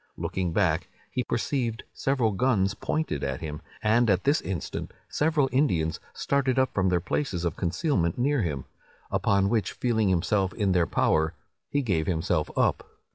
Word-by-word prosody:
Looking 90 -2 -2
back, - - +1 0.2
he - - -1
perceived 120 -5 -1
several 130 -5 +1
guns 100 -3 +2
pointed 155 - -2
at 65 -1 -2
him, 75 -2 -5 0.2
and 115 +2 +4
at 95 -1 +2
this 145 +3 +3
instant 90 -7 -4 0.2
several 150 -2 +2
Indians 85 - +1
started 135 -2 0
up 130 0 +2
from 95 -1 +2
their 90 -1 +2
places 90 - -2
of 85 - -1
concealment 85 - 0
near 140 +1 +2
him; 75 -8 -2 0.5
upon 100 -1 +2
which, 110 0 0
feeling 110 -5 +1
himself 95 +1 +1
in 100 -4 +1
their 90 -2 +3
power, 80 +2 +2 0.3
he 145 -1 0
gave 85 -9 0
himself 80 -2 0
up. - - +2
100 Hz, 160 wpm, -27 LUFS, 85-130 Hz, 0.5 s, and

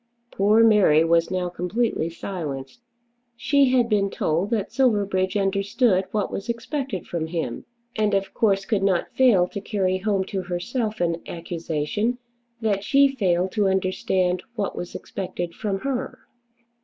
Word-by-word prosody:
Poor 210 +3 +4
Mary 205 -8 +5
was 165 0 +2
now 185 -1 -1
completely 180 +1 -1
silenced. 165 - -6 0.5
She 275 +3 +3
had 250 -2 +3
been 205 -3 +1
told 170 +2 -1
that 220 -4 -1
Silverbridge 205 -7 +1
understood 200 +1 +1
what 210 -2 -1
was 200 +4 -5
expected 235 - -3
from 165 -2 -3
him; 165 0 -4 0.3
and 210 -2 +1
of 195 0 -1
course 195 -3 +1
could 210 -4 0
not 190 -3 0
fail 225 -9 +4
to 200 - -6
carry 190 -3 0
home 195 -1 0
to 190 0 -4
herself 210 +5 -3
an 170 -1 0
accusation 170 +7 -2 0.4
that 205 -3 0
she 275 +4 +4
failed 185 -5 +1
to 205 -1 +1
understand 185 -1 0
what 205 -4 -2
was 175 - -6
expected 175 -3 -5
from 195 -1 -3
her. 270 -2 -3
195 Hz, 145 wpm, -24 LUFS, 180-220 Hz, 0.5 s, Mary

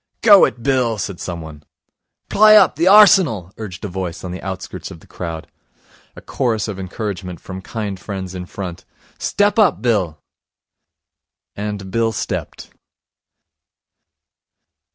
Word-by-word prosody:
'Gow 205 -3 +8
it, 120 - -5
Bill!' 125 -5 +1
said 100 -3 -5
someone. 80 -4 -7 0.7
'Pliy 215 +1 +7
up, - - +5
the 170 - +1
Arsenal!' 185 - +5
urged 105 -2 -7
a - - -2
voice 90 -2 -5
on 90 - -5
the 90 - -7
outskirts 95 -1 -6
of 80 - -11
the - - -19
crowd. 80 -2 -6 0.7
A - - -11
chorus 115 -5 -1
of 100 -3 -6
encouragement 95 -2 -5
from 95 0 -8
kind 100 -2 -5
friends 95 -2 -6
in 90 -1 -7
front: 90 -3 -7 0.4
'Step 205 +2 +1
up, 195 -9 +4
Bill!' 95 -10 0 1.4
And 100 -2 -5
Bill 115 +1 +1
stepped. 110 - -5
100 Hz, 130 wpm, -19 LUFS, 90-115 Hz, 1.4 s, Gow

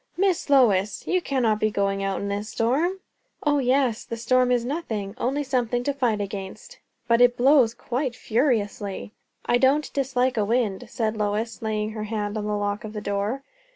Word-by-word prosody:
"Miss 370 -5 +1
Lois! 210 -8 +3
you 365 0 +1
cannot 240 -9 +1
be 215 - +2
going 195 -1 0
out 195 0 -1
in 200 - -3
this 205 +2 -3
storm?" 315 +12 0 0.4
"O 290 -1 +2
yes. 255 -3 +1
The 230 - -6
storm 250 +2 +2
is 240 -1 +2
nothing 225 -9 -3
only 275 +4 0
something 245 -3 0
to 285 - 0
fight 245 -6 0
against." 195 0 -7 0.3
"But 235 0 +4
it 245 0 +5
blows 255 -3 +4
quite 250 +1 -3
furiously." 215 -6 -1 0.3
"I 240 - +3
don't 280 +4 +2
dislike 260 -2 0
a 215 - +3
wind," 220 -3 0
said 225 -3 -1
Lois, 215 +2 -2
laying 215 -1 -2
her 215 -1 -5
hand 210 -1 -3
on 210 -1 -3
the 210 0 0
lock 205 0 -2
of 215 -1 -7
the 210 - -4
door. 205 +6 -2
230 Hz, 185 wpm, -24 LUFS, 210-260 Hz, 0.4 s, it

